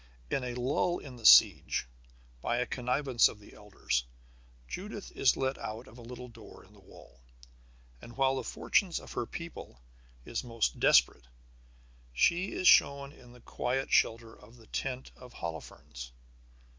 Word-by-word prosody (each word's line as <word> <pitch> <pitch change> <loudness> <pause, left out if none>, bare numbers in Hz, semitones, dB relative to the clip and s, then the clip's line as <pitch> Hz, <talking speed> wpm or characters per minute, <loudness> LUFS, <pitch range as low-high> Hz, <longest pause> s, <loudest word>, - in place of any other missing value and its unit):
In 135 - 0
a 125 -1 -4
lull 140 +8 0
in 130 -3 -11
the 115 - +3
siege, - - +6 0.6
by 120 - -1
a 125 - 0
connivance 125 0 +2
of - - -11
the 105 - -16
elders, 95 -11 -3 0.6
Judith 205 - -7
is 135 - +2
let 135 0 -1
out 110 +3 -6
of 120 - -14
a - - -10
little 125 +1 -9
door 115 -2 -14
in - - -22
the - - -19
wall. 70 - -17 0.8
And 120 +1 -12
while 135 0 +2
the - - -3
fortune - - 0
of - - -12
her - - -3
people - - -9 0.5
is 115 - -4
most 115 - -2
desperate - - +4 0.9
she 175 - +2
is 185 - 0
shown 140 0 +5
in 125 -4 -17
the 125 - -17
quiet 130 +4 -3
shelter 115 0 +2
of 115 +3 -18
the 115 - -17
tent 130 +3 -5
of 125 -1 -14
Holofernes. 70 -7 -8
125 Hz, 160 wpm, -30 LUFS, 115-135 Hz, 0.9 s, siege